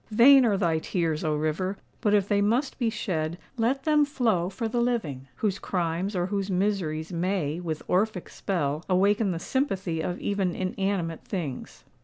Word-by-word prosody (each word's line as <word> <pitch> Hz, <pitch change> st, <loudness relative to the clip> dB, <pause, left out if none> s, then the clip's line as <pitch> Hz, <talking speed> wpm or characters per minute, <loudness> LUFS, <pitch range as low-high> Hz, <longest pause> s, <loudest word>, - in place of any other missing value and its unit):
Vain 250 Hz, +4 st, +7 dB
are 205 Hz, -3 st, +2 dB
thy 170 Hz, -4 st, +1 dB
tears, 165 Hz, -2 st, -1 dB
O 155 Hz, -2 st, +1 dB
River! 155 Hz, +6 st, -1 dB, 0.2 s
But 210 Hz, -3 st, +3 dB
if 200 Hz, -2 st, +2 dB
they 205 Hz, -1 st, +2 dB
must 240 Hz, +7 st, +1 dB
be 235 Hz, -3 st, +2 dB
shed, 170 Hz, -7 st, -2 dB, 0.2 s
let 255 Hz, +3 st, 0 dB
them 300 Hz, 0 st, +4 dB
flow 225 Hz, -11 st, +1 dB
for 225 Hz, +4 st, -3 dB
the 240 Hz, +2 st, 0 dB
living, 165 Hz, -, -1 dB
whose 200 Hz, -, -1 dB
crimes 180 Hz, +2 st, -2 dB
or 175 Hz, -1 st, +1 dB
whose 200 Hz, +1 st, -2 dB
miseries 180 Hz, -4 st, -1 dB
may, 170 Hz, -3 st, -1 dB
with 160 Hz, -3 st, -5 dB
Orphic 190 Hz, 0 st, 0 dB
spell, 155 Hz, -5 st, -2 dB
awaken 200 Hz, +3 st, +3 dB
the 175 Hz, -, -1 dB
sympathy 190 Hz, -, -1 dB
of 175 Hz, +2 st, -3 dB
even 195 Hz, -4 st, -1 dB
inanimate 185 Hz, -3 st, -2 dB
things. 160 Hz, -9 st, -5 dB
190 Hz, 170 wpm, -27 LUFS, 165-215 Hz, 0.2 s, Vain